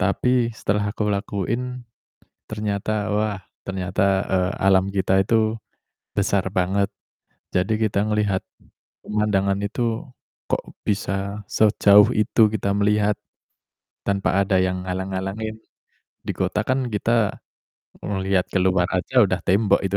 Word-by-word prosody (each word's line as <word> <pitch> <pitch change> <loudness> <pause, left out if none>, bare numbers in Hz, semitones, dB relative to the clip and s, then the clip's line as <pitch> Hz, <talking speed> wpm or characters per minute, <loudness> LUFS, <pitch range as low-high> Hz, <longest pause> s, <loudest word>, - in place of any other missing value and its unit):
Tapi, 120 +5 +2
setelah 105 -1 -1
aku 105 -1 -1
lakuin, 115 +5 -2 0.7
ternyata, 105 0 -2
wah, 105 -1 0 0.3
ternyata, 95 +1 0
eee, 95 0 +1
alam 95 0 +4
kita 95 -1 +2
itu 110 +1 +2 0.6
besar 100 -1 +1
banget. 95 +2 +1 0.6
Jadi 95 +4 +1
kita 105 -1 +1
ngelihat 105 -3 +1 0.6
pemandangan 100 -2 0
itu 115 +2 -2 0.4
kok - - 0 0.2
bisa 100 0 -2
sejauh 105 -1 +6
itu 110 +1 +4
kita 100 -2 -1
melihat, 105 +1 +2 0.9
tanpa 100 -1 +1
ada 95 - 0
yang 90 0 -1
halang-halangin. 95 +4 -3 0.7
Di - - -1
kota 95 +3 0
kan 130 -1 +1
kita 110 0 +1 0.7
ngeliat 95 -2 0
keluar 90 -1 +2
aja 120 +8 +3
udah 95 -2 -1
tembok 100 +1 +3
itu. 95 +1 -1
100 Hz, 115 wpm, -23 LUFS, 95-105 Hz, 0.9 s, sejauh